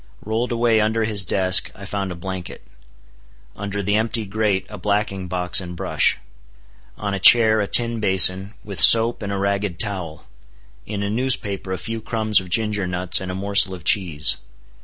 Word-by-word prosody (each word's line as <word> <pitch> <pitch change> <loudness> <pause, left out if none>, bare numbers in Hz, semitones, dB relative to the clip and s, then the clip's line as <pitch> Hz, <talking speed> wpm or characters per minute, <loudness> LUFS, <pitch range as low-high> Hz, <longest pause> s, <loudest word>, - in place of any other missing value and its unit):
Rolled 115 +3 -3
away 115 -2 +1
under 110 +1 -1
his 105 -3 -1
desk, 95 +1 +2
I 100 - -11
found 100 -2 -5
a - - -7
blanket; 90 0 -8 0.9
under 100 0 -5
the 100 +2 0
empty 110 0 -3
grate, 100 -1 -2
a 105 - -11
blacking 100 -1 -3
box 90 0 +1
and 90 -1 -9
brush; 85 -5 0 0.8
on 100 -1 -5
a 100 - -3
chair, 110 +2 +6
a 100 - -3
tin 115 0 +3
basin, 95 0 +4
with 100 -5 -8
soap 115 +7 +5
and 100 -1 -5
a 100 - -3
ragged 100 -2 -3
towel; 90 -6 -5 0.6
in 100 -1 -5
a 100 - -3
newspaper 105 -6 -2
a 95 - -3
few 115 +2 -6
crumbs 110 -2 0
of 95 -1 -11
ginger 105 -1 -1
nuts 90 0 +3
and 95 -1 -6
a - - -6
morsel 100 -1 +2
of 90 - -14
cheese. 85 -8 +1
100 Hz, 180 wpm, -20 LUFS, 95-110 Hz, 0.9 s, chair